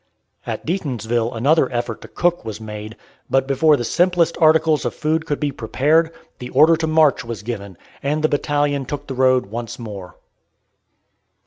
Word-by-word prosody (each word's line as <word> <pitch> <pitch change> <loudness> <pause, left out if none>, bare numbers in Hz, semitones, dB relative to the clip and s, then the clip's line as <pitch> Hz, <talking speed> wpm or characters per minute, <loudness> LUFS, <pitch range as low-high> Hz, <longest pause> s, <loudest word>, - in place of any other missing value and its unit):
At - - -4
Deatonsville 120 - -1
another 140 +3 +3
effort 120 -2 -3
to - - -10
cook 175 0 0
was 110 -2 -6
made, 105 0 -8 0.3
but 135 0 +2
before 145 +3 +3
the 120 - -3
simplest 175 +5 +2
articles 155 -1 +4
of - - -3
food 160 +1 -1
could 145 - -2
be 145 -1 -1
prepared, 150 +7 +1 0.3
the 125 - -7
order 155 +6 +5
to 160 0 -2
march 155 -3 +3
was 115 -4 -7
given, 100 -5 -6 0.2
and 150 +2 -1
the - - +5
battalion 145 -1 0
took 145 0 -5
the 135 - -5
road 130 0 +3
once 115 +3 -6
more. 100 -6 -8
135 Hz, 165 wpm, -20 LUFS, 115-155 Hz, 0.3 s, order